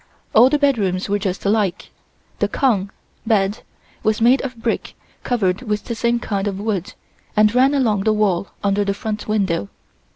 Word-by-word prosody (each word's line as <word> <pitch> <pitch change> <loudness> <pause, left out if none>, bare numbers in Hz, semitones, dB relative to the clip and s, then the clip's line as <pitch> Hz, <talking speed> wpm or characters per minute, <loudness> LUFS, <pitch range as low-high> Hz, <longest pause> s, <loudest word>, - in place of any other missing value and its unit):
All 240 +4 +7
the 295 - +2
bedrooms 210 -11 +1
were 205 0 +1
just 195 -1 -3
alike. 200 -3 0 0.5
The - - +2
kong 210 -8 +1 0.4
(bed) 205 0 +1 0.4
was 215 0 +1
made 245 +4 +4
of 255 -3 -6
brick 225 0 -3 0.3
covered 200 -5 0
with 210 -4 -3
the 235 - -3
same 235 +1 +1
kind 205 -4 -2
of 195 -1 -3
wood 200 -4 -3 0.4
and 210 0 +5
ran 265 +3 +4
along 220 -7 +1
the 220 - +4
wall 200 -3 +1 0.2
under 200 0 +2
the 200 0 -1
front 210 0 -4
window. 190 - 0
210 Hz, 170 wpm, -20 LUFS, 195-235 Hz, 0.5 s, All